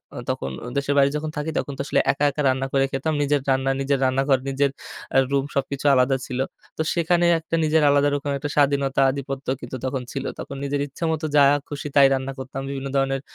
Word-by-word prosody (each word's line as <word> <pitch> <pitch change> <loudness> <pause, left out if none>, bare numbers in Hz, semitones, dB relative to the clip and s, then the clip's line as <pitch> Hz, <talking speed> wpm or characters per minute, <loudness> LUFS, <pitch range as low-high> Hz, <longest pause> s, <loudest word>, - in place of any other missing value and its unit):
আ - - -7
তখন 65 - -2 0.3
দেশের 140 0 0
বাইরে 140 0 +5
যখন 155 0 -4
থাকি, 150 +2 -2
তখন 140 - -4
তো - - -2
আসলে - - +1
একা, 140 +1 -3
একা 150 - -3
রান্না 130 +1 +1
করে 135 0 +3
খেতাম। 145 +4 -1
নিজের 145 -1 +1
রান্না, 135 0 +2
নিজের 135 0 +1
রান্নাঘর, 135 0 +2
নিজের 140 0 +1 0.4
আ - - +6
রুম 140 0 +1
সবকিছু 140 0 -2
আলাদা 130 +1 +3
ছিল। 130 0 -4 0.4
তো 160 - 0
সেখানে 175 +1 +2
একটা 165 +1 -3
নিজের 155 0 +3
আলাদা 145 0 +4
রকম 145 0 -3
একটা 145 +2 -4
স্বাধীনতা 140 -1 +2
আধিপত্য 135 0 -6
কিন্তু 125 +2 -6
তখন 130 -1 -2
ছিল। 135 -1 -4
তখন 140 - -6
নিজের 140 0 -1
ইচ্ছে 140 +5 -9
মত 160 0 -2
যা 145 - +7 0.2
খুশি, 145 0 -5
তাই 140 -1 +8
রান্না 135 0 -2
করতাম। 130 +1 -6
বিভিন্ন 140 0 -4
ধরনের 135 0 +1
140 Hz, 210 wpm, -23 LUFS, 135-145 Hz, 0.4 s, তাই